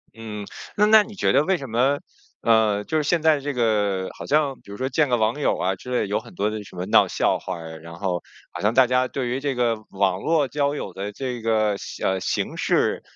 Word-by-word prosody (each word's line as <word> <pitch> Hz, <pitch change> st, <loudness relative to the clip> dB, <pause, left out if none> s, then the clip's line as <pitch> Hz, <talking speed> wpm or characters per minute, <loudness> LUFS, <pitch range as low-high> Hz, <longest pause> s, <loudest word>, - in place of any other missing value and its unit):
嗯， 105 Hz, -2 st, -7 dB, 0.3 s
那 210 Hz, -, +5 dB
那 215 Hz, 0 st, +7 dB
你 215 Hz, 0 st, -11 dB
觉 -, -, +2 dB
得 145 Hz, -, +4 dB
为 190 Hz, +2 st, +1 dB
什 135 Hz, -, -7 dB
么， 130 Hz, +5 st, +2 dB, 0.4 s
呃， 110 Hz, -3 st, +3 dB
就 160 Hz, -, -1 dB
是 155 Hz, -, +1 dB
现 170 Hz, +3 st, +2 dB
在 155 Hz, -2 st, +4 dB
这 145 Hz, +1 st, -3 dB
个 105 Hz, -6 st, +1 dB
好 -, -, -8 dB
像 145 Hz, -2 st, +2 dB
比 -, -, -18 dB
如 100 Hz, -, -7 dB
说 130 Hz, -, -1 dB
见 140 Hz, +1 st, +1 dB
个 120 Hz, -, +3 dB
网 110 Hz, +6 st, 0 dB
友 -, -, +1 dB
啊 95 Hz, +1 st, 0 dB
之 125 Hz, +7 st, -10 dB
类 125 Hz, -5 st, +1 dB
有 105 Hz, -, 0 dB
很 115 Hz, +1 st, -14 dB
多 105 Hz, +2 st, 0 dB
的 110 Hz, -1 st, -5 dB
什 95 Hz, -, -14 dB
么 90 Hz, +1 st, -4 dB
闹 -, -, +5 dB
笑 -, -, +1 dB
话 -, -, -5 dB
儿 80 Hz, -1 st, -8 dB
呀， 80 Hz, -, -9 dB
然 85 Hz, +1 st, -11 dB
后 90 Hz, -1 st, -2 dB, 0.3 s
好 -, -, -7 dB
像 105 Hz, +3 st, +2 dB
大 130 Hz, -1 st, +7 dB
家 125 Hz, +1 st, +2 dB
对 130 Hz, -1 st, -3 dB
于 130 Hz, -, -1 dB
这 140 Hz, -1 st, -2 dB
个 120 Hz, -2 st, +2 dB
网 95 Hz, -1 st, +1 dB
络 160 Hz, -4 st, +2 dB
交 145 Hz, +1 st, 0 dB
友 95 Hz, -10 st, -5 dB
的 100 Hz, +2 st, -5 dB
这 125 Hz, +1 st, -5 dB
个 110 Hz, -2 st, +2 dB
形 -, -, -6 dB
呃， 95 Hz, 0 st, +1 dB
形 90 Hz, -, -2 dB
式， -, -, +1 dB
115 Hz, 275 characters per minute, -23 LUFS, 100-140 Hz, 0.4 s, 那